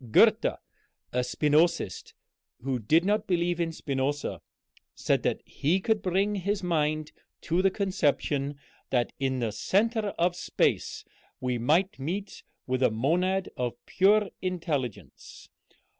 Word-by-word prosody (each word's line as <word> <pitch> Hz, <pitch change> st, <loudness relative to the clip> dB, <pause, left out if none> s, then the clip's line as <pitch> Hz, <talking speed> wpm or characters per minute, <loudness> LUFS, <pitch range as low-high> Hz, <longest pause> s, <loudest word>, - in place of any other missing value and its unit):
Goethe, -, -, +5 dB, 0.7 s
a 125 Hz, -, +1 dB
Spinozist 150 Hz, +6 st, +1 dB, 0.5 s
who 130 Hz, -1 st, -1 dB
did 160 Hz, -, +3 dB
not 210 Hz, +1 st, +1 dB
believe 175 Hz, -1 st, +1 dB
in 165 Hz, -1 st, 0 dB
Spinoza, 140 Hz, -2 st, -2 dB, 0.5 s
said -, -, +1 dB
that -, -, -1 dB
he 165 Hz, +7 st, 0 dB
could 215 Hz, +2 st, +1 dB
bring 195 Hz, +3 st, +1 dB
his 200 Hz, 0 st, -1 dB
mind 155 Hz, -3 st, 0 dB, 0.3 s
to 170 Hz, +2 st, +1 dB
the 195 Hz, -, +4 dB
conception 145 Hz, -7 st, 0 dB, 0.3 s
that 120 Hz, -2 st, 0 dB
in 135 Hz, -1 st, 0 dB
the 115 Hz, -3 st, -1 dB
centre 215 Hz, -, +1 dB
of 175 Hz, +1 st, +2 dB
space -, -, 0 dB, 0.3 s
we 125 Hz, -1 st, -1 dB
might 160 Hz, +7 st, +2 dB
meet 190 Hz, +9 st, -4 dB, 0.2 s
with 130 Hz, 0 st, -1 dB
a 130 Hz, -, +5 dB
monad 180 Hz, -, +1 dB
of 120 Hz, -1 st, -2 dB
pure 205 Hz, +2 st, +3 dB
intelligence. 160 Hz, -, -4 dB
165 Hz, 130 wpm, -28 LUFS, 135-190 Hz, 0.7 s, Goethe